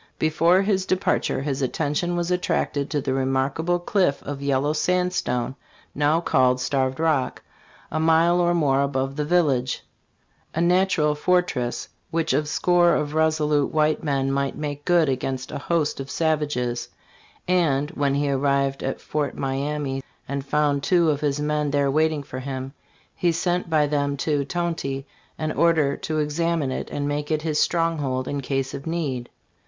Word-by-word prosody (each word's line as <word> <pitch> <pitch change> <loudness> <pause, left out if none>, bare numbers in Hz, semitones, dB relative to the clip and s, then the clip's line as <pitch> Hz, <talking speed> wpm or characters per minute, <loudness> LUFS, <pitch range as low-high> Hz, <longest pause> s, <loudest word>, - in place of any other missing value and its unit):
"Before 165 +4 +3
his 190 -2 0
departure 185 -7 0
his 140 -1 -2
attention 150 +6 -1
was 175 0 -1
attracted 150 -5 0
to 150 -2 -1
the 135 0 -1
remarkable 135 +6 0
cliff 175 -4 +1
of 140 -1 -5
yellow 140 +1 +1
sandstone, 160 -7 0 0.4
now 150 +3 +2
called 130 -6 +2
Starved 130 +1 0
Rock, 155 -5 0 0.5
a 155 - -1
mile 165 +2 +4
or 175 0 +2
more 140 -5 +2
above 135 -1 -1
the 150 - -1
village, 145 -7 +1 0.7
a - - 0
natural 175 -3 +3
fortress, 150 -6 0 0.2
which 165 0 0
a 150 0 +1
score 175 +2 +3
of 150 0 -2
resolute 155 -2 +2
white 155 0 +1
men 135 -3 0
might 140 0 -1
make 145 -1 -5
good 175 -3 +4
against 130 -1 -2
a - - -4
host 155 -1 0
of 135 0 -6
savages; 145 -6 -1 0.6
and 150 -6 +2
[when 140 -1 0
he 145 0 +1
arrived 140 0 +1
at 135 - -3
Fort 150 -2 -3
Miamis 135 0 -2 0.3
and 140 0 -3
found 145 0 +1
two 170 +1 +3
of 145 -1 -2
his 145 -1 0
men 150 0 0
there 140 -1 +1
waiting 155 0 +1
for 130 -1 -7
him, 130 0 -5 0.4
he 175 - +2
sent 175 +1 -1
by 155 -2 +3
them 140 -1 0
to] 145 +1 0
Tonty 160 -5 -3 0.3
an 155 -1 -2
order 155 -5 +3
to 155 - -3
examine 155 -1 0
it - - -4
and 145 0 -3
make 145 0 -2
it 155 -1 0
his 155 -2 0
stronghold 150 -7 0
in 145 -1 -2
case 135 0 -2
of 140 - -7
need." 140 -8 -2
150 Hz, 160 wpm, -24 LUFS, 135-165 Hz, 0.7 s, mile